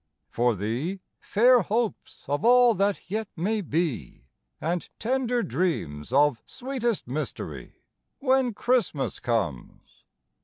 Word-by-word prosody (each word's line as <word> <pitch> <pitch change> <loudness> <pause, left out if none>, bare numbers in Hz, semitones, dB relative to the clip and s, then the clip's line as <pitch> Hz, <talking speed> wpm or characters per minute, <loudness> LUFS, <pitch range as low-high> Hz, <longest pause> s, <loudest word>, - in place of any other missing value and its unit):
For 120 -1 +2
thee, 120 - -3 0.2
fair 245 +3 +4
hopes 220 +3 -2
of 145 +2 -1
all 245 0 +6
that 200 -2 -1
yet 220 0 -1
may 210 +6 0
be, 155 - -3 0.3
And 170 +2 -2
tender 245 0 0
dreams 95 - -2
of 145 -2 +3
sweetest 250 - -3
mystery, 150 +5 -6 0.3
When 260 -4 +2
Christmas 225 - 0
comes. 100 - -3
190 Hz, 110 wpm, -26 LUFS, -, 0.3 s, all